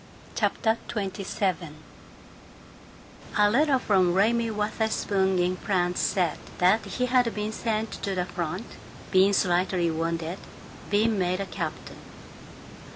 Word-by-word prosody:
CHAPTER 225 0 +1
XXVII 190 -5 -2 1.6
I 210 - +5
A 205 - +3
LETTER 280 +3 +3
from 185 -7 +2
Raymie 230 +4 +2
Wutherspoon, 210 -3 0
in 180 +1 +1
France, 180 -3 0
said 175 -5 0 0.2
that 185 +5 +4
he 250 - -2
had 250 -2 +2
been 210 +1 -2
sent 220 -1 -2
to 195 -1 -2
the 180 -1 0
front, 180 +3 -4 0.5
been 190 +1 +5
slightly 180 -2 +1
wounded, 165 +2 -2 0.5
been 215 +1 +2
made 180 0 0
a 195 - -2
captain. - - -6
195 Hz, 120 wpm, -26 LUFS, 180-220 Hz, 1.6 s, I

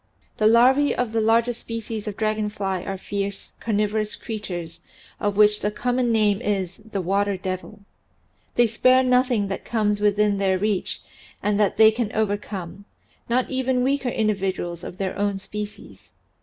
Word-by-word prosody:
The 215 - +5
larvae 255 +6 +5
of 245 -3 -1
the 225 0 +1
larger 230 +2 +3
species 225 -2 -6
of 205 - -4
dragon 215 -1 0
fly 195 -3 -3
are 195 - -4
fierce, 200 +1 -4
carnivorous 215 -1 0
creatures 180 -7 -6 0.4
of 205 -1 -1
which 210 0 +5
the 210 - +1
common 245 +3 0
name 210 -3 +2
is 190 -3 -2
"the 215 -2 -5
water 200 +2 +1
devil." 185 +3 -5 0.7
They 240 - +5
spare 255 +3 +4
nothing 250 -4 +2
that 195 - -4
comes 210 -3 0
within 210 -1 +2
their 190 -1 +2
reach 205 -1 -1 0.4
and 205 0 +1
that 205 -3 +2
they 220 0 +8
can 220 -1 -2
overcome 200 -3 -3 0.4
not 250 +3 +1
even 260 -1 +1
weaker 270 -1 +1
individuals 195 -6 -1
of 180 - -8
their 190 -1 -2
own 205 -1 0
species. 210 +1 -8
210 Hz, 155 wpm, -23 LUFS, 200-230 Hz, 0.7 s, they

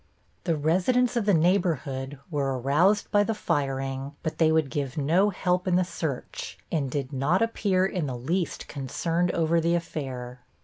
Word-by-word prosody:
The 165 -3 +2
residents 190 - +2
of 235 -4 +1
the 205 - +4
neighborhood 155 -6 +1
were 135 -3 0
aroused 165 - +2
by 205 - +5
the 225 +1 -1
firing, 135 -4 -2
but 160 - -3
they 160 -1 +5
would 160 -3 +2
give 140 -2 -3
no 170 +8 +3
help 180 -1 0
in 180 - +3
the 185 - +4
search 160 -6 -5
and 145 -5 0
did 140 +1 -3
not 150 +10 +2
appear 200 -5 +1
in 180 -5 -2
the 125 -2 -4
least 165 +9 -2
concerned 165 +5 -1
over 165 0 +2
the 170 +1 +2
affair. 130 -7 -5
160 Hz, 170 wpm, -26 LUFS, 135-185 Hz, -, by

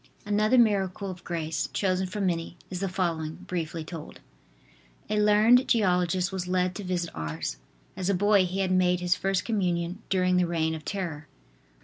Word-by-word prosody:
Another 215 +4 +3
miracle 200 -4 +2
of 180 -1 -11
grace, 165 -2 -2
chosen 190 -1 0
from 200 +1 -2
many, 170 -1 -2
is 180 - -3
the 195 0 -1
following, 165 -4 -2
briefly 165 -2 -4
told: 160 -1 -9 0.9
A 210 - +2
learned 215 +5 +5
geologist 180 -4 +2
was 185 -2 -4
led 180 0 +1
to 205 - -6
visit 180 -2 -2
Ars. 80 -2 -4 0.4
As 185 0 -2
a 200 - +3
boy 205 0 +4
he 190 +2 -2
had 190 -1 0
made 180 -1 +3
his 180 0 +2
First 195 -2 -1
Communion 180 -3 -1
during 185 -1 +2
the 180 -1 +2
reign 160 -1 0
of 160 -1 -6
terror. 165 -7 -4
185 Hz, 170 wpm, -27 LUFS, 170-195 Hz, 0.9 s, learned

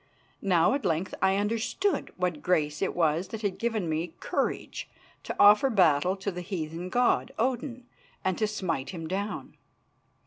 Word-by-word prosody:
Now 180 +1 +3
at 280 - -1
length 165 +4 0
I 190 0 +4
understood 230 - 0
what 180 -4 -1
grace 150 -4 +1
it 195 - 0
was 165 +1 +1
that 220 +3 -7
had 200 -3 -1
given 225 -6 -1
me 160 +1 -2
courage - - -2 0.4
to - - -4
offer 210 +6 +7
battle 180 - +3
to 200 +1 -3
the 180 0 -6
heathen 175 -1 -4
god, 245 +4 +2
Odin, 250 +1 -1 0.4
and 190 -1 +2
to 215 - +2
smite 180 -10 -2
him 165 -3 -6
down. 200 +4 -4
190 Hz, 160 wpm, -28 LUFS, 170-215 Hz, 0.4 s, offer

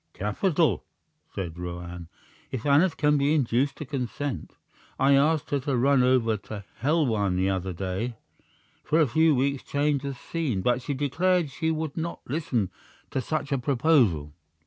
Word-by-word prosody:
"Capital," 125 - +1 0.5
said 90 -3 -5
Roane 90 -1 -6 0.4
"if 130 -4 -5
Aneth 155 +5 +4
can 150 -1 +3
be 145 +3 +3
induced 135 0 +1
to 150 - -7
consent. 130 - -4 0.4
I 135 +1 +4
asked 150 +2 +2
her 145 - +2
to 135 0 -1
run 135 +2 +4
over 125 -3 +3
to 100 0 -8 0.2
Helwan 120 - +2
the 95 +1 +1
other 95 0 -2
day, 95 +7 -3 0.7
for 155 +2 +2
a 160 - +6
few 160 +4 +3
weeks' 140 +1 0
change 145 -1 0
of 140 -2 -4
scene; 135 - -2
but 125 +3 +2
she 140 +2 -3
declared 165 +3 +1
she 160 +4 -1
would 160 -2 -2
not 170 +1 -3
listen 125 - -1 0.4
to 135 - -1
such 150 +1 -3
a 135 - +1
proposal." 120 - +2
135 Hz, 160 wpm, -26 LUFS, 110-150 Hz, 0.7 s, a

